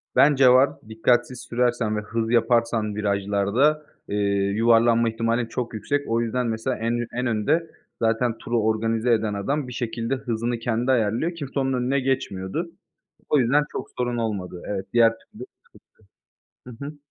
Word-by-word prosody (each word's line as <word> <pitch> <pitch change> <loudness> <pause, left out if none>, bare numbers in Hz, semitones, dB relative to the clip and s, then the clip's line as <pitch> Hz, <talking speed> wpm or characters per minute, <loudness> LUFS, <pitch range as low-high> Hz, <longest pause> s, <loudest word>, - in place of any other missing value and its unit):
Bence 135 -2 +6
var, 130 +2 +6 0.2
dikkatsiz 120 +3 +1
sürersen 120 -3 0
ve - - -2
hız 115 +1 -3
yaparsan 115 -2 +2
virajlarda, 100 +8 +1 0.2
eee, - - -3 0.4
yuvarlanma 115 +1 +4
ihtimalin 115 +1 0
çok 120 +1 -4
yüksek. 145 +6 -2
O 115 +1 +1
yüzden, 120 +1 -1
mesela, 115 +3 -2
en 115 +1 -1
ü 120 -1 -3
en 125 +1 -2
önde 145 +9 0 0.3
zaten 115 +1 +1
turu 120 0 -1
organize 115 +2 +1
eden 110 -2 0
adam 135 +8 -2
bir 125 - -7
şekilde 115 +1 -2
hızını 120 -1 -3
kendi 120 +2 0
ayarlıyor, 120 +8 +1
kimse 140 -3 -4
onun 135 0 0
önüne 130 +2 0
geçmiyordu. 135 - -2 0.6
O 150 - +4
yüzden 135 +4 +3
çok - - -5
sorun 120 -1 -1
olmadı, 100 -6 -3
evet, 95 -2 -3
diğer 115 -1 +6
türlü - - -12 1.2
sıkıntı. 125 +2 -9
Hı - - -4
hı. 150 +1 -8
115 Hz, 160 wpm, -24 LUFS, 110-125 Hz, 1.2 s, Bence